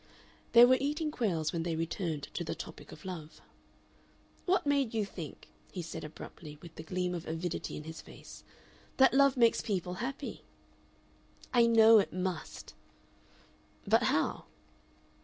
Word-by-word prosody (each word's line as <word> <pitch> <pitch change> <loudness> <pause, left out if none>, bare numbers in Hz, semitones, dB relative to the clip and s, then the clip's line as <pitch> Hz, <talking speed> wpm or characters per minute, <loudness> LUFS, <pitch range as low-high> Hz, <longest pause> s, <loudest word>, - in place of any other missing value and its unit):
They 240 +1 +10
were 255 +1 +4
eating 300 +3 -1
quails 175 - -1
when 165 - -1
they 165 0 -2
returned 165 -2 -2
to 175 - -2
the 160 - -4
topic - - -9
of 155 - -12
love. 165 -5 -7 1.1
"What 370 -2 +2
made 280 -5 +1
you 215 -2 +1
think" 165 -7 -9 0.2
he 180 - -5
said, 165 0 -7
abruptly, 150 0 -10
with 165 0 -12
the - - -8
gleam 180 +2 -2
of 170 -2 -5
avidity 165 +1 -3
in 150 - -7
his 160 +1 -8
face, - - -13 0.5
"that 265 0 +6
love 275 0 +5
makes 235 -2 +4
people 180 -4 -2
happy?" 275 +3 -5 1.1
"I 235 -2 +6
know 225 -1 +7
it 195 - 0
must." 185 -2 -4 1.1
"But - - +4
how?" - - 0
185 Hz, 150 wpm, -32 LUFS, 165-240 Hz, 1.1 s, They